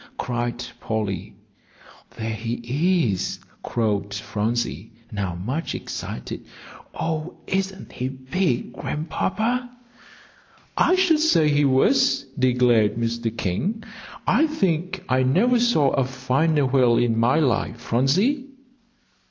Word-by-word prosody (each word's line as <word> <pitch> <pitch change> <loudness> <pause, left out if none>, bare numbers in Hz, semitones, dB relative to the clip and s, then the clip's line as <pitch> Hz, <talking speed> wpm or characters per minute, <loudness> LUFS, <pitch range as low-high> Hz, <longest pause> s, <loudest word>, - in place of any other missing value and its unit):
cried 120 0 -2
Polly. 105 -2 -3 0.8
"There 110 0 -3
he 120 - 0
is!" 95 - -2 0.2
crowed 105 -3 -1
Phronsie, 110 +1 -2 0.2
now 100 -5 -3
much 130 - -3
excited. 60 - -6 0.5
"Oh, 160 +1 -3
isn't 190 0 -3
he 130 +1 -3
big, 130 +2 -2
Grandpapa?" 220 +10 -2 1.1
"I 365 - +4
should 365 -4 +3
say 165 - +4
he 145 0 +3
was," 260 - +3 0.2
declared 125 -4 +3
Mr. 115 0 -2
King. 190 - -2 0.4
"I 300 +8 +4
think 185 - -1
I 130 0 +2
never 200 - +3
saw 195 - +3
a 135 - +2
finer 135 +4 +1
whale 125 -3 +4
in 115 -2 +2
my 120 +6 +3
life, 125 -5 0
Phronsie." 190 - +1
130 Hz, 110 wpm, -23 LUFS, 115-185 Hz, 1.1 s, I